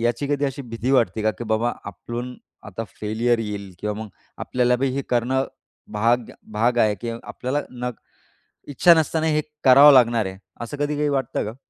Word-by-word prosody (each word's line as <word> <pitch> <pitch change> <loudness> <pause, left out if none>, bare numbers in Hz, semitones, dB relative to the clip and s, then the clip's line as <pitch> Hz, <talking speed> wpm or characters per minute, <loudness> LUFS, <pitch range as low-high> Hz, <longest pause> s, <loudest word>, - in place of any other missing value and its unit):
याची 120 +3 0
कधी 145 0 0
अशी 140 0 -3
भीती 115 +1 -4
वाटते 115 -4 +2
का? 110 - +3
की 110 +4 -8
बाबा 115 +2 0
आपण 120 +6 -6 0.3
आता 105 +3 -6 0.2
फेल्यर 115 +3 +1
येईल 100 -3 -5
किंवा 105 +2 -3
मग 110 - -8 0.3
आपल्याला 125 -1 +1
बी 135 +2 0
हे 140 - -2
करणं 125 +2 +1 0.5
भाग 115 +3 +1 0.2
भाग 120 +3 +1
आहे, 110 -3 +3
की 115 +3 -6
आपल्याला 140 +3 -3
न 125 0 -4 0.8
इच्छा 170 +5 +5
नसताना 160 0 0
हे 155 -1 +2 0.2
करावं 140 +3 +9
लागणार 120 -4 +4
आहे, 95 0 -7 0.2
असं 120 +5 -6
कधी 145 +1 -1
काही 150 0 0
वाटतं 135 -2 -1
का? 110 +4 -6
120 Hz, 180 wpm, -22 LUFS, 110-135 Hz, 0.8 s, करावं